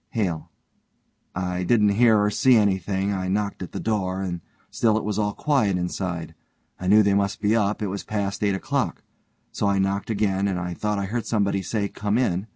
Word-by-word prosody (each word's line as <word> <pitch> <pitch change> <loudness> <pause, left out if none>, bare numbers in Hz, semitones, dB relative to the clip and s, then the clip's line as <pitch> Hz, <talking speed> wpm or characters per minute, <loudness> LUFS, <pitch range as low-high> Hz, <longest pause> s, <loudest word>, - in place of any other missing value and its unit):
HALE: 95 - -2 0.9
I 90 0 -2
didn't 105 +2 +3
hear 110 +2 +4
or 105 0 +2
see 130 +4 +4
anything; 100 -1 +1
I 95 -1 -2
knocked 100 +1 -1
at 90 - -6
the - - -5
door, 95 -3 -1
and 85 -2 -4 0.3
still 110 -2 +2
it 110 - -2
was 105 0 -2
all 105 -1 0
quiet 125 -11 +1
inside. 90 -2 -3 0.5
I 90 - -4
knew 105 +3 +6
they 100 0 +3
must 100 0 0
be 105 +2 +2
up, 105 -1 0
it - - 0
was 100 +1 -4
past 100 -2 -3
eight 100 -1 +2
o'clock. 95 - -2 0.5
So 105 - -1
I 100 0 +2
knocked 95 +2 -1
again, 100 -2 +1
and 95 -2 -1
I 90 -1 -4
thought 105 +3 -2
I 100 - -1
heard 115 +4 -3
somebody 100 -3 +1
say, 100 +2 -2
'Come 105 +2 -1
in.' 100 -5 0
100 Hz, 205 wpm, -24 LUFS, 95-105 Hz, 0.9 s, knew